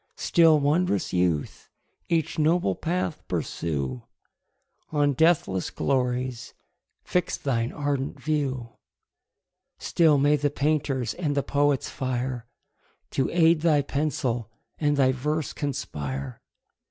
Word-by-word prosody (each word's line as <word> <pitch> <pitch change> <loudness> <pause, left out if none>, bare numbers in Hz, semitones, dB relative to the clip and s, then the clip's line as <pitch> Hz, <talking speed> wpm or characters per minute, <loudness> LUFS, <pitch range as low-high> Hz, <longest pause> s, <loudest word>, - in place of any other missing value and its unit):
Still, 165 -3 +4
wond'rous 145 - +1
youth! 90 -4 -1 0.4
each 165 -1 0
noble 155 - +2
path 170 - -2
pursue, 70 -6 -3 0.9
On 145 -2 +2
deathless 150 - +2
glories 125 -2 -1 0.5
fix 180 -2 -1
thine 120 -4 -1
ardent 145 -1 -2
view: 135 -4 -1 1.1
Still 160 -4 +3
may 145 +2 +4
the 145 0 +1
painter's 140 -3 0
and 150 -5 -2
the 140 - +2
poet's 145 -1 +1
fire 125 -2 -3 0.6
To 135 - 0
aid 165 -2 +4
thy 155 -3 +3
pencil, 130 -6 -2 0.3
and 145 -2 +1
thy 130 -2 +4
verse 150 +4 -2
conspire! 70 - -4
140 Hz, 105 wpm, -26 LUFS, 125-155 Hz, 1.1 s, Still